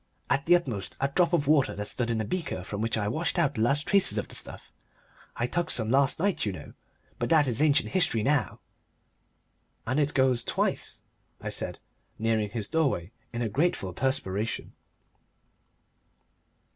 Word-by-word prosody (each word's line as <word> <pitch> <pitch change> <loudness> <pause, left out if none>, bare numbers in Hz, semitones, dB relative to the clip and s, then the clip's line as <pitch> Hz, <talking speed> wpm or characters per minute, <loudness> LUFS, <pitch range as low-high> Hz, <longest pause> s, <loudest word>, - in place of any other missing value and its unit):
"At 140 +1 +1
the 175 - +7
utmost 120 - -3
a 135 - +1
drop 170 +4 +2
of 170 -5 +2
water 145 -3 +3
that 105 - -4
stood 120 +2 -2
in 115 -1 0
a 110 - -1
beaker 170 - -3
from 100 +2 -5
which 115 0 0
I 105 - 0
had 105 - -1
washed 165 +8 -1
out 165 -5 +2
the 110 - -2
last 140 +6 +2
traces 200 -1 +3
of - - -2
the - - -9
stuff. - - -7 0.6
I 120 - 0
took 175 +7 -1
some 110 -2 +1
last 135 +1 +3
night, 195 +3 0
you 105 - 0
know. 90 - -10 0.5
But 120 - -1
that 155 -3 +5
is 120 +1 0
ancient 150 -2 +3
history, 140 - +2
now." 145 +2 0 1.2
"And 130 +5 0
it 145 0 0
goes 130 -3 +3
twice?" - - -1 0.4
I - - -5
said, - - -3 0.4
nearing 110 -2 0
his 105 -1 -4
doorway 135 - 0 0.2
in 120 0 -2
a - - 0
grateful 110 - 0
perspiration. 110 -4 -2
130 Hz, 180 wpm, -28 LUFS, 110-155 Hz, 1.2 s, the